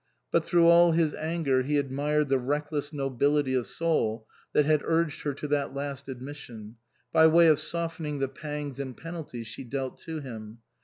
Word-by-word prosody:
But - - +3
through 170 -1 +3
all 170 0 +7
his 160 -2 +2
anger 155 -5 0
he 145 +3 0
admired 145 +2 0
the 135 -1 +3
reckless 145 +2 -2
nobility 140 0 +1
of 125 -2 0
soul 115 -10 0 0.3
that 150 - +3
had 155 0 +3
urged 165 -2 0
her 145 - -2
to 150 - -5
that 140 -2 0
last 140 -1 -5
admission, 125 -4 -9 0.4
by 160 0 +7
way 165 +1 +6
of 155 -2 +5
softening 165 -1 -2
the 135 -1 0
pangs 145 0 -6
and 130 -3 -5
penalties 160 -8 -7
she 110 - -6
dealt 130 +1 -4
to 160 -1 -6
him. 110 -5 -8
145 Hz, 175 wpm, -28 LUFS, 130-155 Hz, 0.4 s, all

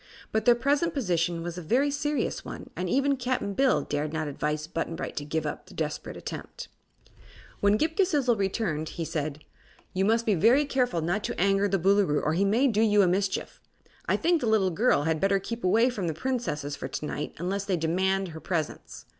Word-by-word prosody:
But 220 0 0
their 240 - +7
present 290 +6 +1
position 175 - 0
was 175 +1 -5
a - - -6
very 255 - +2
serious 295 +1 -1
one - - -8
and 180 0 -3
even 275 +5 +2
Cap'n 250 -5 -1
Bill 265 +5 +2
dared 145 +1 -2
not 160 -1 -2
advise 150 +1 -2
Button 165 0 -3
Bright - - -5
to 145 - -2
give 155 +1 -2
up 150 - -5
the - - -14
desperate - - -4
attempt. - - -7 0.9
When 205 +1 +3
Ghip 320 +6 0
Ghisizzle 295 - +2
returned 190 -6 -1
he 165 - -2
said: 150 -1 -4 0.5
"You 190 - +1
must 225 +3 +2
be 215 - +3
very 235 - +4
careful 250 - 0
not 175 +6 -1
to - - -4
anger 195 +2 +3
the 195 0 +1
Boolooroo, 195 -4 +3
or 155 - +1
he 190 +4 +2
may 230 +8 +3
do 220 -4 +2
you 210 -2 +5
a - - +3
mischief. 190 +1 -1 0.5
I - - +2
think 340 -1 +2
the 235 - -1
little 200 -4 +3
girl 205 -3 +2
had 160 0 0
better 195 +3 +3
keep 230 +5 -6
away 230 +7 +4
from 195 -7 -3
the 160 - -2
Princesses 155 - -2
for - - -5
to - - -5
night, 150 0 -4
unless 190 +4 -2
they 190 -3 0
demand 190 +4 0
her 160 0 -8
presence. 160 -2 -4
195 Hz, 210 wpm, -27 LUFS, 165-240 Hz, 0.9 s, their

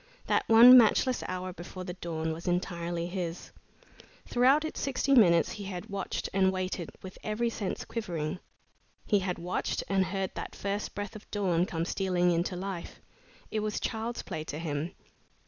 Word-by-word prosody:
That - - +1
one 235 +3 +10
matchless 245 +2 +3
hour 185 0 -4
before 175 +2 -8
the 180 -1 -5
dawn 160 -3 -3
was 165 +2 -8
entirely 175 -1 -1
his. 175 -1 -5 0.7
Throughout 265 +5 +4
its 315 - -5
sixty 275 0 +1
minutes 170 - +5
he 205 -2 -6
had 190 +2 -6
watched 195 -2 -3
and 190 -1 +4
waited 185 -2 -3
with 185 0 -9
every 230 +2 -1
sense 200 -4 -4
quivering. 175 -6 -3 0.7
He 205 - +3
had 185 -2 -2
watched 175 +2 -2
and 190 -1 +2
heard 190 0 -2
that - - -6
first 200 +1 -3
breath 205 0 -5
of 215 - -11
dawn 185 -4 +1
come 165 -1 -2
stealing 180 -2 +1
into 175 +2 0
life. 185 -1 -6 0.5
It 215 - 0
was 215 0 -2
child's 230 +1 -3
play 155 - -5
to 150 - -5
him. 160 0 -3
185 Hz, 165 wpm, -30 LUFS, 175-210 Hz, 0.7 s, one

